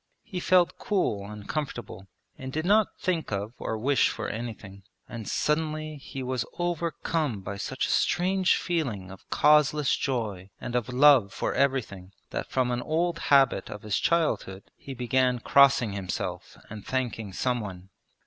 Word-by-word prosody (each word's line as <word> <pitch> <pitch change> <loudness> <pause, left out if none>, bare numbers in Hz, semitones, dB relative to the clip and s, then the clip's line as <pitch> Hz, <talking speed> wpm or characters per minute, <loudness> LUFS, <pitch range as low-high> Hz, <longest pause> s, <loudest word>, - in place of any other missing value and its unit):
He 185 - -5
felt 180 -1 +3
cool 110 - -1
and 105 -1 -9
comfortable 120 -9 -5 0.3
and 130 0 -7
did 155 +4 -2
not 210 +2 +4
think 175 -7 -1
of 100 +2 -3
or 110 - -3
wish 135 +5 +3
for - - -4
anything. 110 -4 -7 0.3
And 115 -3 -7
suddenly 155 0 -1
he 135 -1 -7
was 130 -1 -1
overcome 165 - -1
by 100 +1 -6
such 130 +6 -2
a - - -2
strange 185 +1 +2
feeling 120 - -2
of 95 - -14
causeless 150 -1 +4
joy 105 -8 -3
and 120 - -5
of 120 -1 0
love 130 -5 +6
for - - -2
everything, 105 -9 -1 0.2
that - - -4
from 130 -2 +1
an 120 0 -1
old 165 +3 0
habit 135 -8 +4
of 105 - -8
his 105 -2 0
childhood 150 - 0
he 135 - -9
began 125 0 +1
crossing 135 -3 +4
himself 95 -2 -5
and 105 -2 -9
thanking 120 -5 -3
someone. 100 -5 -3
130 Hz, 155 wpm, -27 LUFS, 105-155 Hz, 0.3 s, love